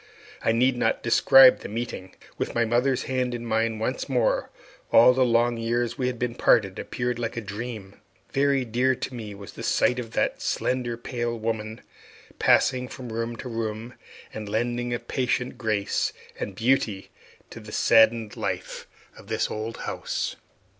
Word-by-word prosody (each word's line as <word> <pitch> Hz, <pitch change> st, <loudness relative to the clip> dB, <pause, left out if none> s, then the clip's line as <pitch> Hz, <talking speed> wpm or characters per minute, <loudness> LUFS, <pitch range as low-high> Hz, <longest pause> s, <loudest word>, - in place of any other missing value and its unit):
I -, -, +3 dB
need 125 Hz, +2 st, +2 dB
not -, -, 0 dB
describe 135 Hz, -1 st, +7 dB
that -, -, -8 dB
meeting. 105 Hz, -4 st, -5 dB, 0.2 s
With -, -, -3 dB
my 115 Hz, -1 st, +3 dB
mother's 125 Hz, +3 st, +1 dB
hand 125 Hz, -1 st, -1 dB
in 120 Hz, 0 st, -6 dB
mine 115 Hz, 0 st, 0 dB
once 125 Hz, +6 st, -3 dB
more, 125 Hz, -4 st, +1 dB, 0.4 s
all 125 Hz, +2 st, +7 dB
the 130 Hz, 0 st, +3 dB
long 120 Hz, 0 st, +2 dB
years 120 Hz, +1 st, -1 dB
we 125 Hz, 0 st, -1 dB
had 125 Hz, -1 st, -2 dB
been 120 Hz, 0 st, -2 dB
parted 100 Hz, -5 st, +2 dB
appeared 120 Hz, -1 st, -3 dB
like 115 Hz, 0 st, -3 dB
a -, -, +1 dB
dream. 105 Hz, -2 st, -7 dB, 0.3 s
Very 135 Hz, -1 st, +2 dB
dear 125 Hz, +3 st, +1 dB
to 130 Hz, -, -5 dB
me 110 Hz, -4 st, -7 dB
was 100 Hz, 0 st, -11 dB
the -, -, -9 dB
sight 125 Hz, -, +2 dB
of 115 Hz, -2 st, -7 dB
that -, -, 0 dB
slender, 125 Hz, -2 st, -1 dB
pale 120 Hz, -1 st, -3 dB
woman 110 Hz, 0 st, -4 dB, 0.6 s
passing 125 Hz, -1 st, +3 dB
from 125 Hz, -3 st, -8 dB
room 115 Hz, +1 st, -3 dB
to 125 Hz, -, -8 dB
room, 115 Hz, 0 st, -4 dB, 0.4 s
and 105 Hz, -1 st, -6 dB
lending 120 Hz, +3 st, -1 dB
a 120 Hz, -, 0 dB
patient 125 Hz, 0 st, -2 dB
grace 105 Hz, -4 st, 0 dB, 0.3 s
and 100 Hz, -, -4 dB
beauty 115 Hz, -4 st, 0 dB, 0.4 s
to -, -, -9 dB
the 110 Hz, -1 st, -11 dB
saddened 110 Hz, -1 st, +4 dB
life -, -, -4 dB, 0.3 s
of -, -, -15 dB
the -, -, 0 dB
old 110 Hz, +1 st, -4 dB
house. -, -, -3 dB
120 Hz, 165 wpm, -25 LUFS, 110-125 Hz, 0.6 s, describe